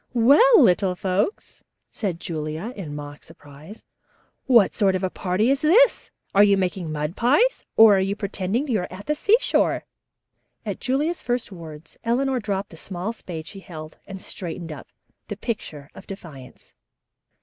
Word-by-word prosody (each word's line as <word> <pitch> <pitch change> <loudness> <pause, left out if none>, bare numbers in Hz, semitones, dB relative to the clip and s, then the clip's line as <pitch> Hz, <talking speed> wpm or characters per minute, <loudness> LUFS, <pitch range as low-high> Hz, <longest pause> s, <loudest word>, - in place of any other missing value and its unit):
"Well, 295 - +6
little 180 0 +3
folks," 190 - -2 0.3
said 190 -7 -3
Julia 160 +7 -5
in 160 -8 -7
mock 145 0 -9
surprise, 155 +5 -14 0.6
"what 235 -6 +5
sort 195 -3 +2
of 185 - -3
a 185 - -1
party 200 +7 0
is 275 +1 0
this? 425 +11 +4 0.2
Are 200 - +6
you 200 -1 +4
making 180 -3 -2
mud 150 +3 -3
pies 295 - +2
or 220 -3 +8
are - - +2
you 195 +1 -1
pretending 205 +5 -2
you 230 -6 +1
are 180 - -4
at 185 +2 -9
the 300 - +1
seashore?" 415 +10 +2 0.8
At - - -4
Julia's 295 +6 -1
first 245 -3 -2
words 165 -3 -11
Eleanor 255 +3 +1
dropped 200 -3 -3
the 165 - -12
small 190 +6 -5
spade 165 -7 -8
she 195 - -10
held 155 -4 -10
and 195 -1 -8
straightened 170 -3 -7
up, 150 - -9 0.4
the 205 - -6
picture 155 -11 -6
of - - -13
defiance. 155 -10 -11
195 Hz, 160 wpm, -23 LUFS, 165-235 Hz, 0.8 s, or